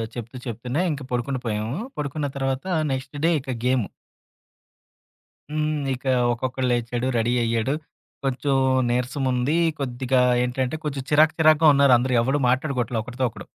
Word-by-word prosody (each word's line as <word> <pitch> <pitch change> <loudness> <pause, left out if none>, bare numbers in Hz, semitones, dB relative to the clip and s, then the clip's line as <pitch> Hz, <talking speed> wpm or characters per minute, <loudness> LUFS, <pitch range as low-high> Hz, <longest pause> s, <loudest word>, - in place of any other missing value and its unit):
చెప్తూ 120 +1 -7
చెప్తూనే 125 +6 -2
ఇంక 145 -1 -4
పడుకుండి 125 +2 -1
పోయాము. 110 +4 -2 0.2
పడుకున్న 145 0 -2
తర్వాత 135 +2 -2 0.3
నెక్స్ట్ 135 +2 -4
డే - - +4
ఇక 130 -1 -4
గేము. 125 -4 +1 1.6
హ్మ్. 155 0 -1
ఇక 130 +2 -8 0.3
ఒక్కొక్కడు 130 +2 -2
లేచాడు, 120 +1 -1
రెడీ 115 +1 +1
అయ్యాడు. 115 +3 0 0.5
కొంచెం 135 +1 0 0.4
నీరసముంది. 125 +2 0 0.2
కొద్దిగా 130 -1 0 0.2
ఏంటంటే 125 +3 -1
కొంచెం 140 -3 -3
చిరాకు 155 +1 +5
చిరాకుగా 155 0 +5
ఉన్నారు. 140 -2 +5
అందరూ 125 +2 -1
ఎవ్వడూ 135 +5 +1
మాట్లాడుకోవట్లే 125 -3 0
ఒకడితో 125 +3 -3
ఒకడు. - - -11
130 Hz, 130 wpm, -24 LUFS, 120-140 Hz, 1.6 s, చిరాకు